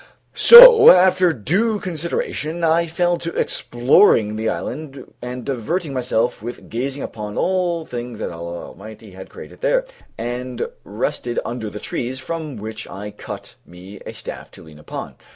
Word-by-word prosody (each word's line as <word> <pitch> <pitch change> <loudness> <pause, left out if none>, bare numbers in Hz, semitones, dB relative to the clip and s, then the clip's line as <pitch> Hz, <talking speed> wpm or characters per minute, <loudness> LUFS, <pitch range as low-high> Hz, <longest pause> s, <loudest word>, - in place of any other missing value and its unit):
So 475 -1 +10
after 185 0 +5
due 190 - 0
consideration 170 -1 -4
I 165 +1 +2
fell 175 +1 0
to 170 - -5
exploring 120 - +2
the 110 +1 -2
island 140 -1 -7
and 125 0 -7
diverting 140 - -3
myself 125 -2 -1
with 120 +2 -9
gazing 135 +4 -4
upon 105 -1 -7
all 175 -3 -1
things 120 -3 -7
that - - -5
Allah 85 +1 -7
Almighty 110 +1 -13
had 95 +1 -11
created - - -13
there; - - +1 0.3
and 120 +1 -4 0.2
rested 120 +3 -4
under 120 -3 -5
the 105 - -8
trees, 125 +4 -5
from 160 +4 -5
one 150 - -8
of 115 - -9
which 110 +1 -7
I 105 +2 -8
cut - - -9
me 90 +3 -13
a - - -7
staff - - -8
to - - -14
lean 80 -2 -15
upon. 75 - -8
125 Hz, 160 wpm, -20 LUFS, 110-170 Hz, 0.3 s, So